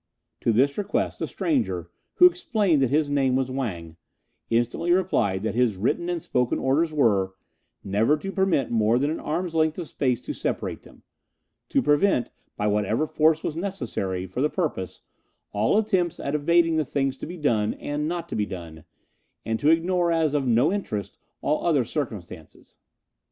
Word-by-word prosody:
To 115 - +1
this 135 - +2
request 205 - -1
the - - -2
stranger, 100 - -1 0.2
who 360 - +7
explained 215 - +3
that 130 - +2
his 150 +2 +2
name 135 -3 +1
was 130 -1 0
Wang, 85 -12 -4 0.5
instantly 120 +9 0
replied 115 - +1
that 110 - -1
his 120 -3 +2
written 150 - 0
and 175 -1 -1
spoken 125 -5 0
orders 155 +5 +1
were: 100 -10 +2 0.5
never 110 +9 +2
to 195 +6 -5
permit 190 - +1
more 115 0 +3
than 145 +4 +1
an 160 - -3
arm's 170 +3 -3
length 160 -1 +1
of 175 -3 -5
space 130 -4 0
to 295 - -5
separate - - -3
them; - - -18 0.7
to 275 - +2
prevent, 150 - +2 0.3
by 105 - -1
whatever 105 +6 +1
force 155 +1 +2
was 155 - -2
necessary 120 - -3
for 95 +7 -4
the 150 - +2
purpose, 150 - -3 0.5
all 105 - +2
attempts 190 -6 +1
at 140 - -3
evading 165 +2 +3
the 155 - +2
things 135 -1 -1
to - - -7
be 175 +2 -7
done 115 -9 +1
and 150 +1 -3
not 170 0 -3
to - - -4
be 105 -1 0
done, 85 -5 -9 0.6
and 110 0 -1
to 145 - +3
ignore 170 +1 +2
as 160 -3 +1
of 140 -3 0
no 120 - +3
interest 105 - -4 0.2
all 150 - 0
other 145 -8 +2
circumstances. 100 - -7
145 Hz, 175 wpm, -25 LUFS, 110-170 Hz, 0.7 s, who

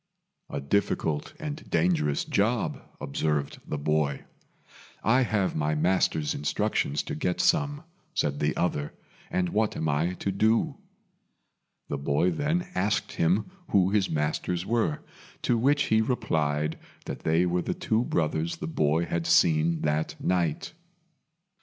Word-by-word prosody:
"A 70 - -3
difficult 75 0 -1
and 155 -1 -6
dangerous 80 -4 +1
job," - - 0 0.2
observed 75 0 -1
the 75 - -2
boy. 75 -1 0 0.8
"I 125 +4 +4
have 110 -6 0
my 75 0 0
master's 80 -2 +1
instructions 75 0 0
to - - -5
get 90 +4 -1
some," 145 -3 +2 0.3
said 70 -1 0
the 75 +1 +1
other, 75 -4 -1 0.4
"and 90 -1 0
what 110 +2 0
am 80 - -1
I 80 +4 +1
to 100 - -2
do?" 110 +9 +2 1.1
The 70 - -2
boy 70 +6 +2
then 155 - 0
asked 100 +3 0
him 95 - +1 0.2
who 95 -1 +3
his 100 -2 +2
masters 80 +3 -1
were, 110 -9 0 0.4
to 120 - +2
which 140 +5 +3
he 110 - +5
replied 75 - 0 0.3
that - - -5
they 80 +3 +2
were 90 0 +1
the - - -2
two 110 +2 +1
brothers 80 -4 0
the - - -6
boy 80 +1 +1
had 85 0 -2
seen 80 0 +4
that 75 +1 -1
night. 85 - 0
85 Hz, 140 wpm, -27 LUFS, 75-105 Hz, 1.1 s, he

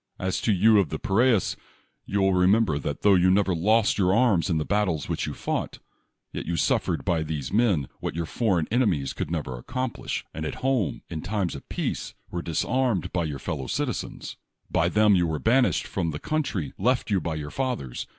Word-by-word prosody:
As 95 0 -2
to 115 - +2
you 105 +2 +5
of 95 -6 +1
the - - -3
Pinrus, 110 +1 +2 0.5
you 100 0 0
will 95 0 +3
remember 90 -3 +3
that 70 0 -4
tho 100 - +6
you 90 0 +4
never 95 0 +3
lost 105 +6 +2
your 95 0 +3
arms 110 -7 +3
in 85 - +1
the 75 - -1
battles 95 -8 0
which - - -2
you - - -5
fought, - - -3 0.6
yet - - -5
you 85 - -1
sufTered - - 0
by 85 -2 +1
these 75 -3 -4
men 100 - +2
what - - -4
your 85 0 -2
foreign 90 -4 0
enemies 95 - +1
could - - -4
never 75 -7 -3
accomplish, 130 - -4
and 80 - -5
at 75 - -3
home, 130 - 0
in 80 -2 -4
times 95 -1 -2
of 70 - -10
peace, - - -3 0.2
were 85 - -3
disarmed 105 - 0
by 85 -2 0
your 75 -3 -4
fellow 70 -1 -4
citizens. - - -3 0.3
By 85 +1 +2
them 105 +1 +4
you 90 -3 +3
were 80 -2 -2
1)anished 125 +3 +3
from 85 -4 -2
the 75 -1 -4
country 140 - -2
left 120 +2 +1
you 95 -3 +2
by 80 -2 -3
your 75 -1 -5
fathers. 125 - -3
95 Hz, 200 wpm, -26 LUFS, 80-110 Hz, 0.6 s, tho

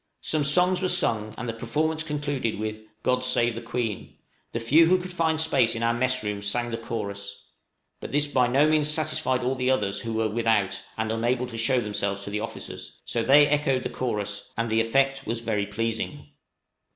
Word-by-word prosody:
Some 155 -1 0
songs 180 +5 +3
were 185 - +1
sung, 110 -12 +2
and 120 - -5
the 115 - -2
performance 155 +8 -1
concluded 145 -7 -2
with 110 0 -5 0.2
"God 125 0 +1
save 120 -2 +2
the 115 - -6
Queen;" 115 -3 -4 0.3
the 115 - -2
few 150 +9 +5
who 185 +2 +5
could 180 0 -6
find 160 -2 +1
space 160 -8 +3
in 115 - -3
our 115 0 +2
mess 130 +1 0
room 105 -1 -3
sang 120 +4 -1
the 115 - -2
chorus; 100 -3 -6 0.5
but - - -7
this 145 +1 +2
by 130 -4 +2
no 135 +5 +4
means 155 -1 +3
satisfied 150 -5 0
all 130 +2 +1
the 130 -1 -1
others 100 -6 +1
who 115 -1 -4
were 110 0 +1
without 110 -3 +1 0.2
and 110 0 -1
unable 120 +3 0
to 120 -2 -8
show 125 +3 +2
themselves 100 -3 -2
to 100 - -6
the 105 - -1
officers, 115 - -7
so 115 - -1
they 145 +5 +6
echoed 145 -3 +1
the - - -3
chorus, 105 -5 -3
and 115 0 -1
the 110 0 +3
effect 135 +4 +1
was 115 +1 -2
very 105 -3 -1
pleasing. 115 +8 -3
120 Hz, 200 wpm, -26 LUFS, 110-145 Hz, 0.5 s, they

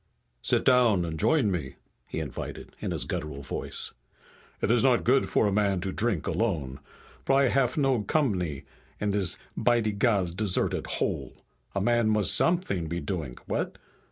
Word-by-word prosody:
"Sit - - +1
down 120 -8 +4
and 80 -1 -5
join 135 - +3
me," 75 -8 -4 0.3
he - - -4
invited, - - -6
in - - -3
his - - -1
guttural 70 -2 -4
voice. 70 - -2 0.7
"It - - +1
is 120 -1 +4
not 125 -2 +3
good 130 +3 +3
for - - +2
a 100 - +2
man 100 -2 +1
to 95 - -2
drink 105 -6 -1
alone. 75 - -1 0.4
But 135 - +2
I 135 0 +4
haf 130 0 +1
no 135 -5 +2
combany 95 - 0 0.4
in 105 -1 0
dis 100 -3 +2 0.2
by 120 -1 +3
de 110 -1 0
gods 100 -5 +1
deserted 95 0 0
hole. - - -3 0.3
A 100 - 0
man 120 +1 +2
must 105 -3 +3
somet'ing 165 - +1
be 85 +1 -2
doing, 80 -10 -4
what?" - - -2
105 Hz, 170 wpm, -27 LUFS, 90-120 Hz, 0.7 s, down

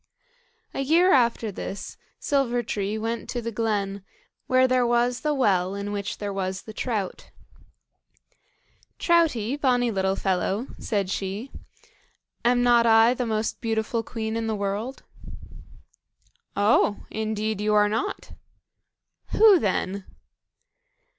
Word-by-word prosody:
A - - -4
year 330 +7 +4
after 235 -4 +2
this 195 +1 -6 0.2
Silver 245 -4 0
tree 205 -1 -2
went 225 +1 -4
to 245 - -2
the 230 0 -4
glen, 205 -3 -2 0.4
where 255 0 +4
there 255 0 +2
was 240 +1 +1
the 300 - 0
well 195 -7 +1
in 200 0 -4
which 205 0 -4
there 205 -1 -4
was 190 -1 -3
the 220 - -10
trout. 215 -6 -3 1.7
"Troutie, 295 - +2
bonny 245 -3 +2
little 190 -1 0
fellow," 195 +4 -1
said 200 -3 -1
she, 200 +7 -4 0.9
"am 245 +1 +3
not 240 -1 +5
I 225 +1 +6
the 250 -1 -3
most 220 0 -2
beautiful 225 0 -1
queen 220 -1 -4
in 225 0 -2
the 220 - -1
world?" 205 +6 -3 1.5
"Oh! 205 0 +2
indeed 215 -1 -2
you 210 0 +1
are 210 0 +5
not." 225 - -3 1.0
"Who 425 -5 +7
then?" 195 -1 -1
220 Hz, 125 wpm, -25 LUFS, 200-245 Hz, 1.7 s, Who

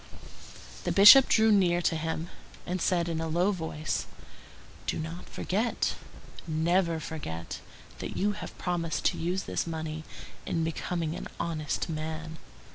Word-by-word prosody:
The - - 0
Bishop 210 +7 +10
drew 220 0 +5
near 180 -4 +4
to 165 - +2
him, 160 +1 -3 0.4
and 180 0 -2
said 175 -2 +2
in 165 -1 -2
a 165 - -2
low 175 +5 +2
voice:— 160 -4 -3 0.8
"Do - - 0
not 165 +3 -6
forget, 220 +6 -1 0.5
never 170 +1 +1
forget, 115 - -6 0.4
that - - -5
you 205 +2 +2
have 205 - -8
promised 170 -2 -2
to - - -7
use 180 +3 -1
this - - -2
money 160 -1 -4 0.4
in 165 - 0
becoming 165 0 -2
an - - -6
honest 160 -3 -2
man." 160 0 -5
165 Hz, 140 wpm, -29 LUFS, 160-180 Hz, 0.8 s, Bishop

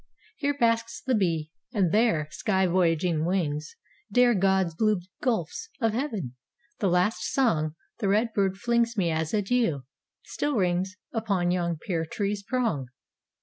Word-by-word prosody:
Here 285 0 -1
basks 230 -2 +1
the 260 - -1
bee; 165 -7 0 0.2
and 190 -7 +2
there, 210 -8 +2
sky 190 -3 +1
voyaging 170 -2 +2
wings 155 -4 -1 0.4
Dare 245 +2 +5
God's 190 -3 +2
blue 215 +3 +2 0.2
gulfs 230 - -1
of 225 -4 +1
heaven; 220 - -3 0.5
the 200 - +2
last 180 +5 +2
song, 155 - +1 0.2
The 210 - 0
red 220 +3 +2
bird 195 -2 +1
flings 235 +1 +1
me 175 -4 +2
as 160 0 -1
adieu, 205 - +1 0.4
still 290 -1 -2
rings 185 0 0
Upon 200 -6 0
yon 170 -2 0
pear 165 0 -2
tree's 200 +4 -2
prong. 215 - -1
195 Hz, 145 wpm, -27 LUFS, 170-230 Hz, 0.5 s, Dare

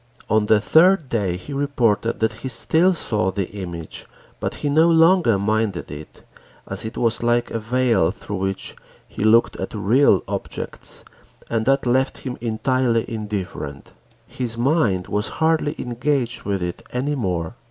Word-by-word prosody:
On 110 0 +3
the 105 0 +4
third 160 - +4
day 100 -7 -1
he 140 +10 -9
reported 120 -6 0
that 110 -1 +2
he - - -4
still 160 +9 +3
saw 105 - 0
the 95 -1 -3
image 85 -5 -7 0.3
but - - -3
he 145 - -3
no 160 +4 +4
longer 165 - +5
minded 110 -1 -1
it, 75 +1 -10 0.4
as - - -2
it 110 - -6
was 115 -1 0
like 120 0 +1
a 115 - -2
veil 115 -5 +2
through 100 +1 -6
which 95 0 -3 0.3
he - - -5
looked 115 +2 +4
at - - -5
real 105 0 +3
objects - - -6 0.5
and 115 0 0
that 135 0 +2
left 130 +2 +1
him 125 -2 -5
entirely 120 0 0
indifferent. 100 -9 -5 0.3
His 120 -3 -4
mind 120 - +1
was 105 +1 -1
hardly 160 -2 +1
engaged 125 0 -1
with 100 -3 -1
it 90 0 -4
any 135 +4 -1
more. 90 - -2
115 Hz, 155 wpm, -21 LUFS, 100-135 Hz, 0.5 s, longer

